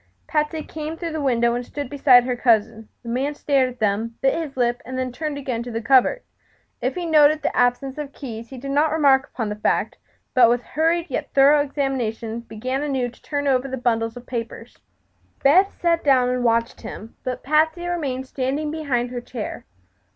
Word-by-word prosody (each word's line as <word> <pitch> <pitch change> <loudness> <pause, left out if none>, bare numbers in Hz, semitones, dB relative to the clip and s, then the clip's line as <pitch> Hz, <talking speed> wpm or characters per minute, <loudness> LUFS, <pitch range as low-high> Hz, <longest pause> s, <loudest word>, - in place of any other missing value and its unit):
Patsy 305 0 -1
came 310 +1 -6
through 335 -1 -4
the 315 -1 -3
window 235 -3 +2
and 245 +1 -2
stood 285 +3 -6
beside 255 -2 +5
her 250 0 -1
cousin. 225 -2 +1
The 235 - -7
man 270 +5 -1
stared 275 -3 +2
at 250 0 -12
them, 220 +2 0
bit 270 - +3
his 310 -5 -4
lip, 240 -1 +1
and 255 +2 -6
then 255 -1 -2
turned 300 +3 -4
again 255 -4 -3
to 240 - -6
the 225 -1 -3
cupboard. 260 - +3 0.6
If - - -1
he 355 -1 -3
noted 305 -1 +4
the - - -1
absence 255 +3 +1
of 290 -2 -5
the - - -23
keys 230 -4 -7
he 265 - -9
did 275 +2 -5
not 295 +2 +2
remark 275 -4 +3
upon 225 -4 -3
the 210 - -3
fact, 210 - -1 0.3
but 245 -3 +6
with 240 +1 +1
hurried 330 +3 0
yet - - -3
thorough 285 +2 +6
examination 245 -6 -2
began 245 +4 -4
anew 265 -4 -1
to 240 - -19
turn 285 -1 -3
over 265 -1 +2
the 265 0 -4
bundles 225 -1 -1
of 245 - -10
papers. 230 -2 -6 0.7
Beth 370 +8 +4
sat 335 -1 +1
down 260 -3 +4
and 250 0 -1
watched 230 0 +1
him, 225 0 -9
but 255 -1 -4
Patsy 315 +4 +2
remained 285 -7 -2
standing 275 +3 -2
behind 260 -6 -1
her 245 -1 -4
chair. 235 -3 -7
260 Hz, 200 wpm, -22 LUFS, 240-295 Hz, 0.7 s, but